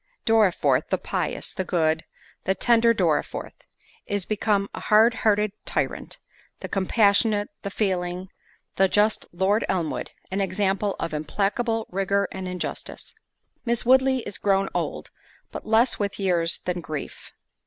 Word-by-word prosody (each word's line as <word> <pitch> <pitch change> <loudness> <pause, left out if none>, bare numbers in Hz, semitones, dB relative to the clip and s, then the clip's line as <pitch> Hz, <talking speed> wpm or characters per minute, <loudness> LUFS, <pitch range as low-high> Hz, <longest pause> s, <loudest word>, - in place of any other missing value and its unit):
Dorriforth, 220 -5 +3
the - - +1
pious, - - -3
the 190 - -2
good, 160 -3 0 0.4
the 190 - +1
tender 235 +1 +4
Dorriforth, 230 - 0 0.5
is 205 -2 -1
become 210 -2 0
a - - -5
hard 220 +3 +5
hearted 210 -3 +2
tyrant. - - -3 0.4
The - - -4
compassionate, 205 +1 +2
the 200 - -4
feeling, 185 -2 -2 0.5
the 195 - +5
just 210 +3 +2
Lord 190 +5 +1
Elmwood, 175 -5 -1 0.2
an 195 +1 0
example 195 +1 0
of 165 - -3
implacable 210 +8 -1
rigour 195 +1 +1
and 190 -1 -5
injustice. 180 0 -6 0.5
Miss 235 -1 0
Woodley 260 +1 +4
is 200 - -5
grown 195 -1 +2
old, - - -3 0.4
but - - -8
less 225 +3 +3
with 200 -1 -2
years 175 -4 +1
than 180 -1 -2
grief. 155 -3 -7
200 Hz, 135 wpm, -25 LUFS, 185-220 Hz, 0.5 s, hard